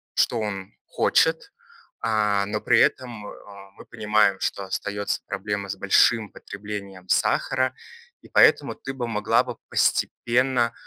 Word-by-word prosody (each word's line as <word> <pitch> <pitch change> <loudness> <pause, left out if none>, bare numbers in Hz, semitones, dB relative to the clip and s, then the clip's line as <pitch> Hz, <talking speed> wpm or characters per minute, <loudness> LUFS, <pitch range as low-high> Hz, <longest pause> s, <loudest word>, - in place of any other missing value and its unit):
что 120 - +2
он 100 -2 -5
хочет. 160 - +1 0.5
А, 105 -3 +1
но 105 +1 -2
при - - +3
этом, 120 -5 0
а, 100 -1 -13
мы - - -13
понимаем, 105 -2 +1
что 100 - -2
остается 100 +1 -3
проблема 100 0 -4
с - - -4
большим 110 -3 +3
потреблением 100 -2 -8
сахара, 130 +6 +1 0.5
и - - -16
поэтому - - +4
ты 135 - -7
бы 125 -3 -4
могла 105 -2 +2
бы - - -6
постепенно, 120 -1 +1
105 Hz, 135 wpm, -24 LUFS, 100-120 Hz, 0.5 s, поэтому